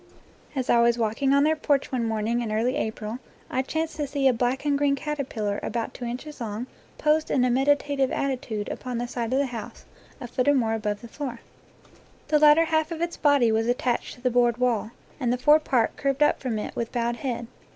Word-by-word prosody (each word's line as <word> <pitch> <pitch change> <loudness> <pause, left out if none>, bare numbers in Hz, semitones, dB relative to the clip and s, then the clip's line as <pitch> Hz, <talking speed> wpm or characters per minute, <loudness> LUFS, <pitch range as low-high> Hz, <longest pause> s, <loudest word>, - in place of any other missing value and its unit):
As 260 -2 -1
I 235 - +4
was 235 0 +3
walking 230 +4 0
on 280 0 +5
their 310 +1 +3
porch 285 -3 0
one 245 -3 0
morning 225 +2 0
in 225 -2 -3
early 230 +5 +1
October 220 -2 -3 0.3
I 260 - +1
chanced 320 +4 -3
to 295 -2 -2
see 275 -1 +1
a 260 - +5
black 250 +4 -1
and 290 -1 +2
green 280 0 +2
caterpillar 260 -8 -3
about 230 -1 -3
two 245 - -7
inches 255 +4 -6
long 220 +1 -4 0.3
posed 310 +1 +2
in 250 -2 +2
a 250 - +2
meditative 280 +1 +2
attitude 245 -6 -2
upon 250 -2 -4
the 240 +1 -2
side 240 -1 -3
18 - - -5
NATURE 255 - 0
LORE 275 - +3
of 265 - -4
the 235 - -4
house 220 - -9 0.3
a 245 - -6
foot 250 +2 -1
or 290 - +5
more 225 -4 +1
above 210 -2 -2
the 235 - -9
floor. 245 -1 -6 0.9
The 300 0 +4
lat 300 0 +7
ter 330 - +4
half 315 0 0
of 330 - -4
its 340 +1 -2
body 285 -6 +3
was 225 +1 +1
attached 245 0 -1
to 245 - -18
the 250 0 +1
board 240 -1 +3
wall, 240 -4 +1 0.3
and 245 -4 0
the 250 - +1
fore 295 +5 +5
part 255 -7 +1
curved 275 +1 +1
up 295 - +3
from 245 -5 -2
it 210 - -5
with 230 - -3
bowed 235 -1 -1
head. 240 -3 -3
250 Hz, 235 wpm, -25 LUFS, 235-285 Hz, 0.9 s, lat